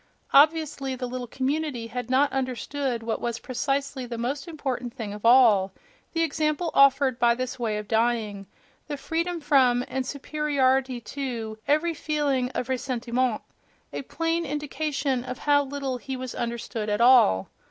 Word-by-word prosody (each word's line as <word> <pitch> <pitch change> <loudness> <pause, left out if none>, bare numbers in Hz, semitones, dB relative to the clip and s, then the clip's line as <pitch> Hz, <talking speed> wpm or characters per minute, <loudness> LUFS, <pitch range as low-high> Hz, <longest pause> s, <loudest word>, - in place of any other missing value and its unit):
Obviously, 290 -2 +3
the 255 0 -4
little 250 0 -5
community 270 -1 -2
had 245 +1 -5
not 270 +3 +3
understood 260 -1 -2
what 225 0 -2
was 235 -1 -2
precisely 275 +1 -2
the 235 -1 -5
most 270 +8 -3
important 260 -7 -4
thing 210 -3 -5
of 210 - -9
all: 230 -6 +6 0.4
the 330 -1 +1
example 310 +1 0
offered 275 -2 +4
by 235 -1 +4
this 255 +1 -4
way 220 -3 -1
of 210 -1 -6
dying, 220 -3 0 0.4
the 290 - -4
freedom 335 +4 -2
from 255 -5 +3
and 265 0 -2
superiority 270 -2 0
to 230 -3 -5
every 310 +4 +2
feeling 290 -5 0
of 250 - -2
ressentiment—a 255 -2 -3
plain 330 +4 -1
indication 290 -3 -2
of 255 0 -6
how 290 -1 +3
little 275 -2 -3
he 265 +1 -6
was 255 -1 -6
understood 235 -2 -4
at 210 +1 0
all! 235 - +5
260 Hz, 150 wpm, -26 LUFS, 240-285 Hz, 0.4 s, all